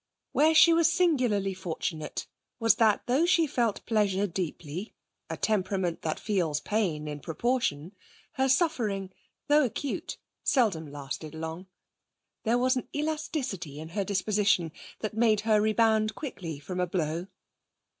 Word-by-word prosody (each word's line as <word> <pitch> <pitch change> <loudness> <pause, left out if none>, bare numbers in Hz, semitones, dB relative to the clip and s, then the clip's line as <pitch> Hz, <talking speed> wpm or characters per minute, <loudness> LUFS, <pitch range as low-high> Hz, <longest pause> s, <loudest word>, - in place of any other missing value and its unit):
Where 315 +2 +4
she 335 +2 +8
was 330 -1 +4
singularly 250 - +2
fortunate 165 -3 -4 0.3
was 225 -1 +4
that 220 -3 +3
though 275 +8 +2
she 335 -2 +4
felt 235 -7 -1
pleasure 205 -3 +2
deeply 175 0 -5 0.3
a - - -4
temperament 190 -4 0
that 155 - -2
feels 175 -8 0
pain 165 -5 -1
in 150 -1 -5
proportion 170 - -1 0.4
her 265 0 0
suffering, 230 - +1 0.4
though 295 +1 +5
acute, 265 +3 -3 0.3
seldom 190 - +1
lasted 145 +2 -6
long. 160 +3 -6 0.8
There 230 +2 +3
was 255 +1 +2
an 255 - -3
elasticity 285 - -3
in 160 +1 -7
her 200 +4 -1
disposition 200 -3 +1 0.3
that 215 - -3
made 220 -2 +3
her 215 -1 +3
rebound 220 0 +2
quickly 175 - -6
from 170 +6 -6
a 180 - +1
blow. 170 0 -2
205 Hz, 135 wpm, -28 LUFS, 170-245 Hz, 0.8 s, she